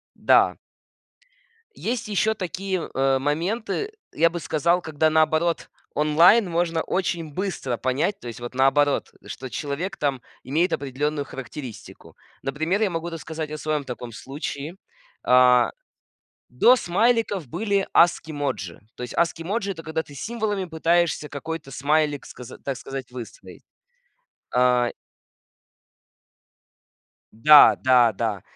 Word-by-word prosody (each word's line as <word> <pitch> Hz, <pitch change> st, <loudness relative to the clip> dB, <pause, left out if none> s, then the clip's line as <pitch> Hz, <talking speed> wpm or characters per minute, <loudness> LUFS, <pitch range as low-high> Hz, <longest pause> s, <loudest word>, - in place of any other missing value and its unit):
да. -, -, +4 dB, 1.2 s
Есть 230 Hz, -1 st, -3 dB
ещё 215 Hz, +1 st, +1 dB
такие, 190 Hz, -1 st, -3 dB
э, 135 Hz, 0 st, +2 dB
моменты, 195 Hz, -, -2 dB, 0.2 s
я 165 Hz, +2 st, +3 dB
бы 175 Hz, -, -5 dB
сказал, 170 Hz, +3 st, +1 dB
когда, 155 Hz, 0 st, +1 dB
наоборот, 160 Hz, +2 st, +1 dB, 0.2 s
онлайн 165 Hz, +8 st, +5 dB
можно 165 Hz, -1 st, 0 dB
очень 170 Hz, -4 st, -2 dB
быстро 175 Hz, -10 st, -3 dB
понять, 140 Hz, -, -1 dB
то 120 Hz, -, -8 dB
есть, 115 Hz, -, -8 dB
вот, 120 Hz, +1 st, -7 dB
наоборот, 135 Hz, +2 st, +2 dB
что 130 Hz, -, -7 dB
человек, 150 Hz, +9 st, -4 dB
там, 140 Hz, -3 st, -1 dB, 0.2 s
имеет 165 Hz, +7 st, +1 dB
определённую 145 Hz, +2 st, -2 dB
характеристику. 135 Hz, -3 st, -10 dB, 0.3 s
Например, 160 Hz, +8 st, -1 dB
я 210 Hz, -, +2 dB
могу 165 Hz, 0 st, -3 dB
рассказать 160 Hz, -1 st, -6 dB
о 155 Hz, -, -4 dB
своём 150 Hz, -1 st, -2 dB
таком 125 Hz, -2 st, -7 dB
случае. 140 Hz, -, -6 dB, 0.5 s
А, 125 Hz, -1 st, +5 dB, 0.8 s
до 235 Hz, -, +5 dB
смайликов 215 Hz, -, +1 dB
были 200 Hz, -, 0 dB
ASCII 165 Hz, -2 st, +3 dB
emoji. 105 Hz, -, -4 dB, 0.2 s
То -, -, -8 dB
есть 125 Hz, -, -6 dB
ASCII 165 Hz, -1 st, +1 dB
emoji- 200 Hz, +2 st, -2 dB
это 165 Hz, -, -10 dB
когда 160 Hz, 0 st, -3 dB
ты 145 Hz, -, -15 dB
символами 210 Hz, -, -2 dB
пытаешься 165 Hz, -2 st, +1 dB
какой-то 150 Hz, 0 st, -6 dB
смайлик, 145 Hz, +1 st, 0 dB
сказа 125 Hz, -, -11 dB
так 135 Hz, -2 st, -4 dB
сказать, 135 Hz, -1 st, -7 dB
выстроить. 120 Hz, -4 st, -10 dB, 0.9 s
А. 125 Hz, -1 st, +3 dB, 2.4 s
Да 150 Hz, +7 st, +8 dB
да 125 Hz, -3 st, +5 dB
да. 105 Hz, -2 st, -2 dB
155 Hz, 125 wpm, -24 LUFS, 135-175 Hz, 2.4 s, Да